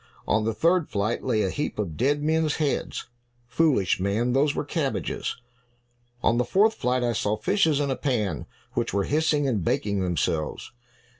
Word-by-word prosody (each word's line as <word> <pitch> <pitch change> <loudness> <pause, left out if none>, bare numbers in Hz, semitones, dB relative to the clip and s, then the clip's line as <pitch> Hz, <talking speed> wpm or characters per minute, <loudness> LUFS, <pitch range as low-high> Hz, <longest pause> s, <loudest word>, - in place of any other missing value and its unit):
"On 110 0 +2
the 115 - 0
third 165 - +2
flight 105 +3 -1
lay 110 -4 +1
a 95 - 0
heap 150 - -3
of 95 -7 -3
dead 145 - +1
men's 160 0 +1
heads." 150 -3 -2 0.4
"Foolish 130 - +2
man, 105 +6 0
those 140 +2 +2
were - - -2
cabbages." 145 -2 -2 0.9
"On 120 - +3
the - - +3
fourth 210 - +3
flight, 125 - 0
I 120 -1 +1
saw 105 -1 0
fishes 160 - +2
in 140 -2 0
a - - 0
pan, 105 - -1 0.3
which - - -1
were 100 - +2
hissing 150 0 +1
and 110 -9 0
baking 100 +4 0
themselves." 85 -3 -2
125 Hz, 170 wpm, -25 LUFS, 105-150 Hz, 0.9 s, On